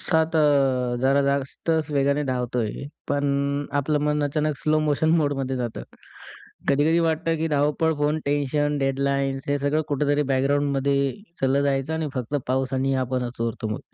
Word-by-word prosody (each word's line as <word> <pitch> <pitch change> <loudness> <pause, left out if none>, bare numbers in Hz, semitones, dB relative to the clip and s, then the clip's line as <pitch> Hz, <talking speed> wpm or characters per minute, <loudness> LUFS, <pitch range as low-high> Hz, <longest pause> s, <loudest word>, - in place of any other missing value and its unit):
सात 160 -1 +1 0.7
जरा 135 +2 +3
जास्तच 140 +3 -1
वेगाने 140 +1 +1
धावतोय, 125 -1 -2 0.2
पण 140 0 0
आपलं 150 +2 0
मन 150 0 +1
अचानक 150 +1 -1
स्लो 155 0 +1
मोशन 155 +1 +1
मोडमध्ये 135 -4 0
जातं. 120 - -4 0.9
कधी-कधी 150 +4 +3
वाटतं, 165 0 0
की 160 +1 -1
धावपळ, 150 +2 +1
फोन, 150 +1 +1
टेन्शन, 145 +1 0
डेडलाइन्स 135 0 -1
हे 145 0 +1
सगळं 145 +3 +1
कुठेतरी 145 +1 +1
बॅकग्राऊंडमध्ये 140 +1 +1 0.4
चाललं 135 +1 +2
जायचं 140 +2 0
आणि 160 -2 -2
फक्त 130 +1 -4
पाऊस 130 0 0
आणि 135 +1 +1
आपणच 125 -1 -3
उरतो 115 -1 -3
मग. 105 - -3
140 Hz, 140 wpm, -24 LUFS, 135-150 Hz, 0.9 s, जरा